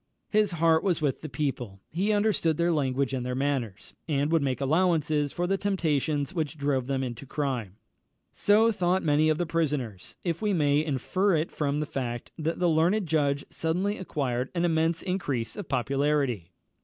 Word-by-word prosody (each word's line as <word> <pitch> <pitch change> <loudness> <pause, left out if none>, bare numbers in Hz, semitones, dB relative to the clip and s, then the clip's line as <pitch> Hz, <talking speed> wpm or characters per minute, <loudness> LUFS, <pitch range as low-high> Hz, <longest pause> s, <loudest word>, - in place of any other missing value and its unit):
His 210 -3 +2
heart 165 -1 +3
was 180 -4 +1
with 145 -4 -1
the 155 - -6
people; 125 -7 -3
he 190 +7 0
understood 205 -7 +2
their 170 +1 +2
language 135 -3 0
and 130 -2 -1
their 125 0 -3
manners, 125 -7 -2
and 145 -1 0
would 165 -2 +3
make 135 -2 -1
allowances 155 -1 +2
for 175 - -2
the 195 +2 0
temptations 155 -5 0
which 160 -3 -2
drove 140 -3 0
them 135 -1 -1
into 125 +1 -6
crime. 130 -10 -3 0.6
So 220 +3 +4
thought 185 -2 +1
many 155 0 +3
of 155 - +2
the 175 - 0
prisoners, 145 - -2
if 170 0 -2
we 210 -2 +1
may 145 -3 +3
infer 170 +7 +1
it 155 +1 -1
from 145 -1 -1
the - - -1
fact 120 -4 -4
that 160 +1 -2
the 180 - +2
learned 170 +6 +2
judge 145 -3 +1
suddenly 185 +6 -1
acquired 130 -8 -2
an 170 0 +1
immense 165 0 +1
increase 140 - -2
of - - -7
popularity. 135 - 0
150 Hz, 180 wpm, -27 LUFS, 135-170 Hz, 0.6 s, So